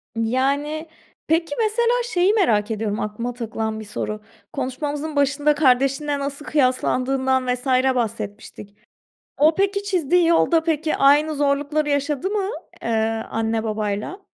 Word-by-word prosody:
Yani, 280 +7 -1 0.4
peki, 325 -1 +1
mesela 460 +2 +2
şeyi 390 -4 +2
merak 225 - +2
ediyorum, 215 -1 -2
aklıma 230 +4 -3
takılan 220 -2 -4
bir 215 - -8
soru: 215 +1 -4 0.3
Konuşmamızın 290 +3 -3
başında 285 +1 +2
kardeşinle 275 +1 +2
nasıl 280 +1 -5
kıyaslandığından 260 -1 +1
vs. 250 +1 -7 0.3
bahsetmiştik. 210 -3 -5 0.6
O, 310 +2 +4
peki, 400 +1 0
çizdiği 360 -3 +2
yolda, 330 -1 +3
peki, 315 -1 0
aynı 295 +3 +4
zorlukları 290 +1 0
yaşadı 285 +4 -1
mı, 400 -2 -1 0.3
eee, - - -2 0.4
anne, 225 0 -1
babayla? 215 - -3
280 Hz, 120 wpm, -22 LUFS, 230-315 Hz, 0.6 s, O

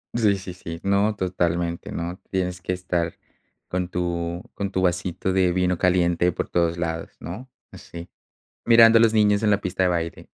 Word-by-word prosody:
Sí, 105 -4 +3
sí, 95 -1 -8
sí. 85 -2 -8
No, 100 +2 +2
totalmente. 85 -2 -2
No, 85 +2 -4
tienes 90 -1 -2
que 90 - -2
estar 90 -2 -2 0.5
con 90 -1 -2
tu 85 -1 -3
con 100 -1 -4
tu 95 - -1
vasito 90 +1 -1
de 95 -1 +3
vino 90 0 +1
caliente 90 -1 +2
por - - -4
todos 85 -1 +1
lados, 80 -1 -3
¿no? 105 +11 -8 0.2
Sí, 85 0 -10 0.6
mirando 115 -1 +7
a - - +5
los 115 -1 +4
niños 105 -1 +3
en 105 - +3
la 100 - +3
pista 95 0 -2
de 90 - +3
baile, 85 -1 -3
90 Hz, 180 wpm, -23 LUFS, 85-100 Hz, 0.6 s, mirando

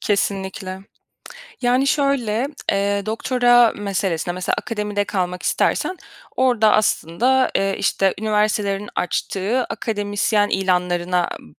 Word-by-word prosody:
Kesinlikle. 190 -2 -2 0.8
Yani 250 +3 +2
şöyle, 275 -4 +1 0.2
eee, 200 0 0
doktora 245 +1 +3
meselesine, 190 -4 -2
mesela, 185 0 -1
akademide 210 -3 -2
kalmak 180 -3 -3
istersen 370 - 0 0.4
orda, 240 -5 +3
aslında, 230 +6 +2
eee, 195 0 0
işte, 195 -1 +1
üniversitelerin 210 -1 0
açtığı 200 +7 -1
akademisyen 205 -1 -1
ilanlarına 180 -2 0
b - - -18
205 Hz, 100 wpm, -21 LUFS, 190-230 Hz, 0.8 s, doktora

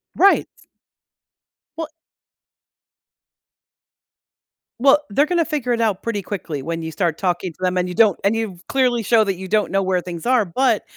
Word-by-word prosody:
Right. 395 +2 +4 1.3
Well 325 -1 -5 2.9
Well, 275 +3 +5
they're 280 +9 +2
gonna 340 0 +1
figure 265 -6 -1
it 230 - -1
out 210 -4 0
pretty 210 -3 -2
quickly 170 -7 -5
when 165 +4 -4
you 160 - -5
start 165 -1 -1
talking 180 -1 -1
to - - -32
them, 185 0 0
and 180 0 0
you 180 - -5
don't 215 -5 +4
and 205 +3 +2
you've 195 -5 -4
clearly 250 -4 +1
show 225 +1 +4
that 195 -2 -1
you 190 +1 -8
don't 210 +2 +1
know 195 0 +1
where 185 -1 0
things 170 -2 -7
are, 245 -4 +3
but, 230 +5 +1
205 Hz, 170 wpm, -20 LUFS, 180-245 Hz, 2.9 s, Well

